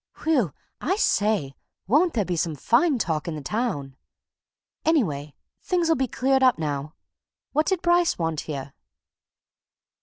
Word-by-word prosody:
Whew! 265 - +2 0.3
I 380 - 0
say, 205 - +1 0.3
won't 300 - +3
there 210 -4 +1
be 180 - -2
some 165 -1 -1
fine 250 - +2
talk 160 -8 -1
in 165 - -3
the 150 - -6
town! 145 - -2 0.9
Anyway, 155 - 0 0.3
things'll 345 -3 +1
be 265 -3 0
cleared 265 +3 +1
up 255 -1 +5
now. 150 -1 -3 0.6
What 305 +2 +1
did 375 -2 0
Bryce 345 0 +3
want 165 -2 -1
here?" 140 -3 -6
215 Hz, 140 wpm, -25 LUFS, -, 0.9 s, up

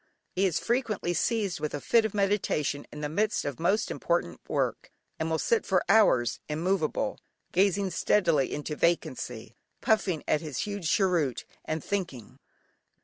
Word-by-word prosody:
He 195 +1 +2
is 170 - 0
frequently 230 -7 -1
seized 205 +1 0
with 150 - -3
a - - -3
fit 230 +8 +3
of 215 - -3
meditation 195 -8 0
in 150 - -8
the 150 - -1
midst 210 +8 0
of 140 -3 -4
most 195 +6 +1
important 170 - -1
work, - - -1 0.3
and 160 0 -1
will 160 - +1
sit 230 +8 +1
for 185 -2 +1
hours, 195 - +4
immovable, 160 +1 -1 0.3
gazing 195 +1 +2
steadily 170 -5 +2
into 150 +1 -4
vacancy, 125 -9 -1 0.2
puffing 195 -7 +1
at 150 - +2
his 150 -5 -4
huge 200 -5 -3
cheroot, 170 - +1 0.2
and 155 -1 -3
thinking. 170 - -4
175 Hz, 150 wpm, -28 LUFS, 150-200 Hz, 0.3 s, hours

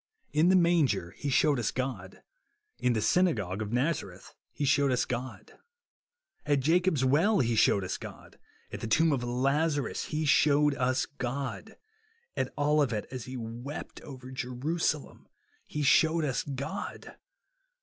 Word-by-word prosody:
In 155 +4 +4
the 190 - +5
manger 160 - +2
he 145 - -5
shewed 140 0 +3
us 115 - 0
God. 120 -8 -5 0.6
In 125 - +2
the 110 -2 -1
synagogue 110 - +1
of 105 -1 -4
Nazareth 135 +7 -2 0.2
he 145 - -3
shewed 140 0 +3
us 125 - +1
God. 125 +1 -6 0.8
At 145 -2 +1
Jacob's 165 -1 +2
well 165 +11 +3
he 120 -2 +1
shewed 100 -2 +3
us 95 - -3
God. - - -11 0.3
At - - -6
the - - -4
tomb 160 +8 +3
of 135 -4 0
Lazarus 140 +4 0
he 155 0 -2
shewed 145 +1 +4
us 130 -1 0
God. 140 - -5 0.6
On - - -1
Olivet, 145 -7 +1
as 130 -3 -6
he 130 0 -7
wept 120 +5 -7
over 130 -3 -10
Jerusalem, 135 +5 -3 0.4
he 150 - -3
shewed 160 +3 +4
us 135 -3 -1
God. 140 +8 -6
140 Hz, 145 wpm, -29 LUFS, 125-150 Hz, 0.8 s, the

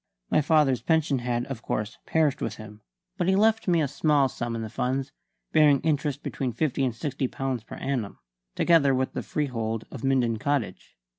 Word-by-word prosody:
My - - +4
father's 150 -4 +3
pension 160 -4 +1
had, 120 0 -1
of 135 -5 -6
course, 105 0 -3
perished 155 -4 +1
with - - -2
him; 105 -1 -11 0.4
but 175 - +1
he 190 - +4
left 220 +2 +3
me 170 -3 +3
a - - +1
small 145 0 +2
sum 120 -1 -4
in 115 - -3
the - - -4
funds, 135 +2 -2 0.4
bearing 150 -3 +5
interest 145 -2 -1
between 130 -3 -3
fifty 135 +2 0
and 125 -3 0
sixty 135 +1 -2
pounds 130 -3 -3
per - - -9
annum, 125 -7 -3 0.4
together 150 -6 +4
with 130 0 -1
the - - -3
freehold 115 -6 -2
of 130 - -8
Minden 125 -4 +2
Cottage. 140 -1 -2
135 Hz, 190 wpm, -26 LUFS, 120-150 Hz, 0.4 s, bearing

